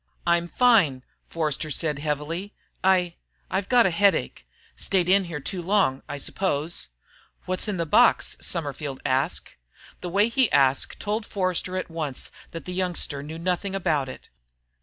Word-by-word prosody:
"I'm 170 0 +2
fine," 180 - +3 0.2
Forster 155 -1 -2
said 150 -1 0
heavily. 155 +6 -3 0.3
"I 180 -2 +3 0.3
I've 190 +1 -1
got 245 -3 +6
a 190 - +3
headache. 170 - +1 0.3
Stayed 180 - +1
in 195 +1 +4
here 165 -4 -5
too 175 +6 -4
long, 185 -7 +2
I 145 - -4
suppose." 160 +1 -1 0.6
"What's 185 +3 0
in 205 -3 -1
the 170 - -1
box?" 150 - +4
Summerford 145 -3 -3
asked. 135 +6 0 0.5
The 180 - -5
way 200 +4 +3
he 255 0 +2
asked 135 -1 +2
told 215 +2 -2
Forster 185 -2 -1
at 185 - -4
once 155 -5 -3 0.2
that 165 -3 -8
the 180 - -4
youngster 180 -6 -1
knew 155 +3 -7
nothing 180 +3 -2
about 150 -8 0
it. - - -11
170 Hz, 155 wpm, -25 LUFS, 150-190 Hz, 0.6 s, got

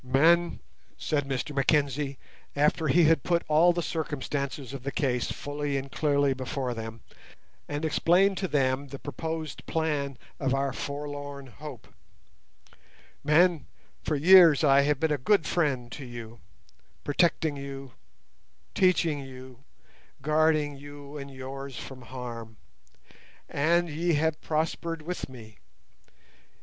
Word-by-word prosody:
"Men," 165 +7 +3 0.4
said 145 -3 -1
Mr 135 +2 -3
Mackenzie, 140 -1 +1 0.4
after 150 +2 +2
he 170 +5 +5
had 160 +1 +4
put 170 -1 +1
all 160 +3 +5
the 175 0 -2
circumstances 140 -4 -3
of 135 - -6
the 140 +2 -3
case 125 -4 0
fully 145 -1 -3
and 135 0 -5
clearly 140 -2 +2
before 130 -1 -3
them, 115 0 -7 0.7
and 145 +2 -2
explained 180 +5 +3
to 190 - -1
them 140 -2 +1
the 140 - -7
proposed 160 +2 -5
plan 145 -5 -1 0.2
of 135 -1 +1
our 135 -1 0
forlorn 145 -1 -5
hope—"men, 150 +4 -3 0.3
for 155 - -1
years 165 0 +7
I 140 -1 +6
have 145 -1 +1
been 160 0 +1
a 145 - -1
good 195 +6 +3
friend 130 -8 0
to 145 - -7
you, 120 -2 -9 0.6
protecting 160 0 +1
you, 135 -2 -7 0.8
teaching 170 -5 +3
you, 130 -1 -11 0.6
guarding 155 -1 +2
you 145 0 -11
and 140 0 -7
yours 135 0 -7
from 130 -2 -8
harm, 120 -2 -8 0.9
and 170 +4 +2
ye 165 +2 0
have 155 +1 +1
prospered 165 +1 -2
with 175 -3 -4
me. 110 -5 -13
145 Hz, 125 wpm, -28 LUFS, 135-160 Hz, 0.9 s, years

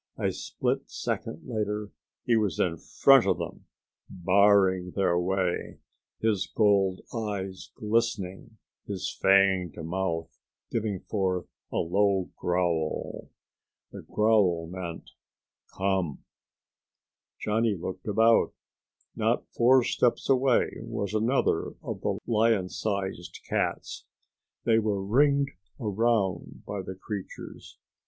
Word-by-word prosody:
A - - 0
split - - -2
second 75 - -4
later 105 -3 -2 0.3
he 120 - +3
was 105 -5 0
in 85 -2 +1
front - - +5
of - - +2
them, - - -6 0.4
barring 95 -1 +3
their 95 -3 +2
way, 90 0 -1 0.4
his 110 -4 +1
gold 100 -3 +2
eyes 100 -4 -4
glistening, 110 -1 -2 0.3
his 100 -3 -4
fanged 95 -4 +4
mouth 85 -1 -3 0.4
giving 105 -5 -2
forth 95 -4 -1 0.3
a - - -6
low 95 +2 +1
growl. 85 -3 -1 0.6
The - - -8
growl 105 -6 +2
meant, 85 -1 -7 0.7
"Come." 95 -6 0 1.2
Johnny 110 0 +1
looked 95 +2 -6
about. 110 +2 +4 0.6
Not - - 0
four 125 +2 +5
steps 120 0 +1
away 130 -2 +3
was 100 0 -4
another 115 +5 +1
of - - -5
the - - -1
lion 110 -4 +2
sized 95 -5 -3
cats. - - -2 0.6
They 115 -1 +4
were 105 -3 -1
ringed 140 +5 +3 0.3
around 105 -4 0
by 100 -1 -4
the 95 0 -7
creatures. 100 0 -8
100 Hz, 105 wpm, -28 LUFS, 90-110 Hz, 1.2 s, front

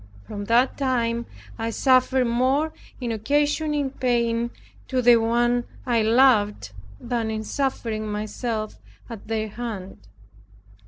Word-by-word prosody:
From 205 -1 -6
that 240 +4 +3
time 235 -3 0 0.3
I 225 0 -1
suffered 255 +1 +3
more 260 +6 +1 0.3
in 245 -3 -3
occasioning 290 +4 0
pain 235 -2 0 0.4
to 260 - 0 0.2
One 240 +1 +1 0.2
I 235 -2 +2
loved, 215 - +3 0.3
than 235 -2 -2
in 220 0 -3
suffering 230 -4 -2
myself 215 +1 -4 0.3
at 225 -3 -9
their 220 -1 -2
hand. 210 - -6
235 Hz, 110 wpm, -24 LUFS, 220-255 Hz, 0.4 s, that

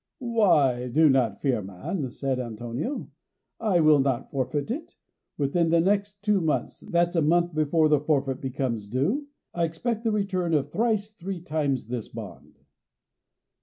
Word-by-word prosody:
"Why, 140 - +3
do 155 +5 +4
not 125 -7 +2
fear, 130 -6 +1
man," 100 - -4
said 130 +1 -2
Antonio; 120 - -4 0.5
"I 195 -7 +2
will 155 -2 +6
not 135 -2 0
forfeit 140 - -2
it. 310 +6 -5 0.4
Within 160 +4 +1
the 170 0 +4
next 200 +2 0
two 210 -2 +2
months 160 -2 -1
that's 175 +1 0
a 165 - +3
month 170 +3 +2
before 155 +1 +3
the 150 -1 +4
forfeit 140 -3 0
becomes 125 -5 -3
due 180 - 0 0.3
I 170 - 0
expect 220 +8 -3
the 225 - +1
return 185 -5 0
of 145 0 0
thrice 215 -2 0
three 190 -2 -6
times 150 -8 -1
this 120 -2 -4
bond." 105 -6 -10
155 Hz, 155 wpm, -26 LUFS, 130-185 Hz, 0.5 s, will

